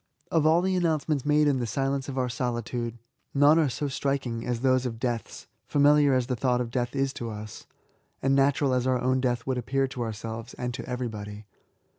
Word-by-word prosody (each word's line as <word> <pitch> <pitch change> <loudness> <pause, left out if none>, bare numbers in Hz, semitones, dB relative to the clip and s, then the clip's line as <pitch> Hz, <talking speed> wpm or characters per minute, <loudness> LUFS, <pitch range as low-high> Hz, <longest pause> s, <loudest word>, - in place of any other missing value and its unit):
Of 160 -2 +3
all 165 +3 +4
the 190 0 +1
announcements 155 -5 0
made 150 0 +4
in 140 -3 +2
the 120 - -2
silence 135 +3 -1
of 135 - -5
our 130 -1 +1
solitude, 120 -1 -3 0.4
none 145 +3 +6
are 155 -4 +3
so 145 +4 -3
striking 130 -4 -2
as 120 -1 -1
those 130 -1 +2
of 115 -2 -6
deaths, 120 -2 -3 0.2
familial* 145 -1 +4
as 130 -1 +1
the 125 0 -2
thought 125 0 +1
of 120 -2 -3
death 120 +1 -2
is 135 0 0
to 120 - -6
us^ 110 -1 -7 0.5
and 135 +1 +1
natural 135 0 +3
as 125 0 +1
our 130 -1 +2
own 130 +1 +1
death 120 -2 0
would 130 -1 -1
appear 135 +3 0
to 125 - -6
our 115 -1 -1
selves, 110 +2 -7
and 125 0 -3
to 130 - -7
everybody. 105 -4 -5
130 Hz, 210 wpm, -27 LUFS, 120-140 Hz, 0.5 s, none